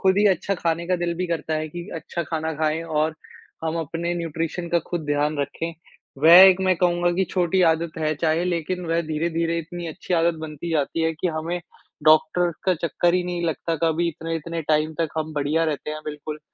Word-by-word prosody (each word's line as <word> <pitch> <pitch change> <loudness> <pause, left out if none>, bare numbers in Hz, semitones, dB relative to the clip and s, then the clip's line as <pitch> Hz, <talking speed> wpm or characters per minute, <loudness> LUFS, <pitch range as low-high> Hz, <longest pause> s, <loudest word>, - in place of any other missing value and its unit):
खुद 190 0 +3
ही 210 - +5
अच्छा 195 +1 0
खाने 170 -1 -1
का 180 - +2
दिल 170 0 -1
भी 180 - -1
करता 160 -1 -2
है, 155 0 -2
कि 175 +3 -8
अच्छा 170 +1 -4
खाना 160 0 -3
खाए 155 +1 0
और 155 -1 0 0.5
हम 160 +1 -1
अपने 165 +2 -3
न्यूट्रिशन 165 +1 -3
का 170 0 +3
खुद 175 - -1
ध्यान 145 +1 0
रखे। 165 +4 -3 0.5
वह 165 - +9
एक 190 -1 +7
मैं 185 -1 +3
कहूँगा 175 0 +2
कि 190 +2 +1
छोटी 180 0 +2
आदत 165 0 -2
है 155 -1 0
चाहे, 160 +2 +1
लेकिन 180 +1 -2
वह 165 +1 +1
धीरे-धीरे 165 +1 0
इतनी 175 +1 -6
अच्छी 170 +3 -3
आदत 170 0 +3
बनती 160 +1 -6
जाती 160 +1 0
है, 160 - +2
कि 165 +3 -2
हमें 170 +2 -3 0.5
डॉक्टर 155 +3 +4
का 185 -1 +3
चक्कर 170 +3 +1
ही 180 -1 +1
नहीं 175 -1 -3
लगता 165 0 -2
कभी 165 +1 +1
इतने-इतने 165 +1 -4
टाइम 155 0 +2
तक 165 - +1
हम 155 0 -3
बढ़िया 150 +3 +1
रहते 150 -1 -2
हैं, 155 0 -5
बिल्कुल। 150 0 -6
165 Hz, 205 wpm, -23 LUFS, 155-175 Hz, 0.5 s, वह